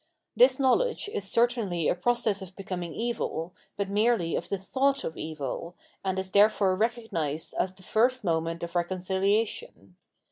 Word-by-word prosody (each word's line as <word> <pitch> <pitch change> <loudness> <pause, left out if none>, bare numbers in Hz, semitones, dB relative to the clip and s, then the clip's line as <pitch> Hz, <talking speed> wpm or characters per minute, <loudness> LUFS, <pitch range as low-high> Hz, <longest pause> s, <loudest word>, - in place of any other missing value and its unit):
This - - +6
knowledge 410 - +2
is 195 -1 -2
certainly 225 -9 +1
a - - +3
process 215 +1 +1
of 190 0 -10
becoming 180 -4 -5
evil, 220 -7 -2 0.2
but 200 -1 -1
merely 205 -4 +2
of - - -3
the 200 - 0
thought 270 +8 0
of 160 - -4
evil, 155 +2 -5 0.3
and 190 -1 -1
is 190 0 -3
therefore 200 -2 +4
recog 225 +2 -1
nised 155 -3 -2
as 185 0 0
the 185 - -17
first 245 +5 +2
moment 165 -1 -1
of 170 +1 -6
reconciliation. 185 - -1
195 Hz, 155 wpm, -28 LUFS, 175-230 Hz, 0.3 s, This